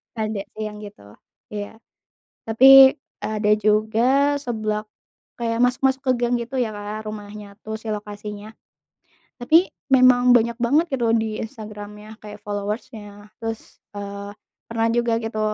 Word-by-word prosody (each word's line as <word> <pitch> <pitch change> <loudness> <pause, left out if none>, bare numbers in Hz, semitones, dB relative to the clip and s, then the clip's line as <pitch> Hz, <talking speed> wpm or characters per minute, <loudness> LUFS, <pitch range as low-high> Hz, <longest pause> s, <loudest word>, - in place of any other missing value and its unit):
Ada 215 -3 -3
sih 215 - -5
yang 210 -1 -6
gitu. 200 - -12 0.4
Iya. 205 +1 -6 0.7
Tapi 265 +5 +7 0.2
ada 215 -1 -1
juga 220 +7 +2
seblak 215 -3 -3 0.5
kayak 230 0 -1
masuk-masuk 265 +2 +1
ke 260 -2 +2
gang 240 0 0
gitu 240 +2 -3
ya 225 -4 -1
Kak 210 +1 -6
rumahnya 205 -1 -8
tuh 220 0 -5
si 225 - -14
lokasinya, 210 0 -6 0.9
tapi 320 +9 +3 0.2
memang 250 -2 +5
banyak 235 0 +2
banget 285 +8 +2
gitu 235 -3 +1
di 220 -1 -1
Instagram-nya 210 -1 -9
kayak 210 -1 -11
followers-nya 205 0 -6
terus, 225 -1 -7 0.2
eee, 200 0 -6 0.4
pernah 230 0 0
juga 235 -1 +1
gitu 225 -1 -4
220 Hz, 130 wpm, -22 LUFS, 210-240 Hz, 0.9 s, Tapi